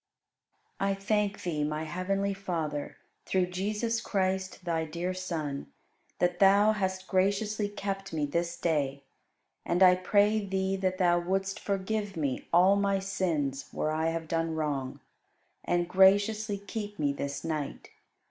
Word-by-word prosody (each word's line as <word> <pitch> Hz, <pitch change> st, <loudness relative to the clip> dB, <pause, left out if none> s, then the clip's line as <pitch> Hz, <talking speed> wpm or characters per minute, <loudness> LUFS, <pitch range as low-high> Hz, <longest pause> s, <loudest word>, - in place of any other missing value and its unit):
37. 195 Hz, 0 st, +1 dB
I 195 Hz, -, -3 dB
thank 205 Hz, 0 st, 0 dB
Thee, 155 Hz, -4 st, -1 dB
my 150 Hz, +1 st, -2 dB
heavenly 195 Hz, +4 st, -1 dB
Father, 165 Hz, -7 st, -3 dB, 0.3 s
through 185 Hz, -1 st, +2 dB
Jesus 210 Hz, +5 st, -1 dB
Christ, 190 Hz, -1 st, -1 dB
Thy 165 Hz, -2 st, 0 dB
dear 170 Hz, +4 st, -3 dB
Son, 160 Hz, -6 st, -4 dB, 0.5 s
that 175 Hz, 0 st, +1 dB
Thou 200 Hz, +2 st, +6 dB
hast 190 Hz, -3 st, -2 dB
graciously 200 Hz, +2 st, +1 dB
kept 195 Hz, -1 st, -4 dB
me 155 Hz, -2 st, 0 dB
this 170 Hz, +3 st, -2 dB
day; 140 Hz, -5 st, -1 dB, 0.6 s
and 175 Hz, +2 st, +2 dB
I 180 Hz, -1 st, +8 dB
pray 205 Hz, +3 st, +2 dB
Thee 190 Hz, 0 st, -1 dB
that 185 Hz, -1 st, -1 dB
Thou 175 Hz, -2 st, +3 dB
wouldst 195 Hz, +2 st, -1 dB
forgive 200 Hz, 0 st, -2 dB
me 140 Hz, -5 st, -2 dB
all 185 Hz, +3 st, +6 dB
my 200 Hz, -1 st, +2 dB
sins 165 Hz, -8 st, -1 dB
where 155 Hz, -, -1 dB
I 160 Hz, +1 st, 0 dB
have 165 Hz, 0 st, -3 dB
done 165 Hz, 0 st, -1 dB
wrong, 140 Hz, -4 st, -2 dB, 0.6 s
and 175 Hz, 0 st, +1 dB
graciously 200 Hz, +3 st, +4 dB
keep 205 Hz, +1 st, -6 dB
me 145 Hz, -2 st, +1 dB
this 140 Hz, 0 st, -4 dB
night. 155 Hz, -3 st, -4 dB
185 Hz, 145 wpm, -29 LUFS, 160-200 Hz, 0.6 s, I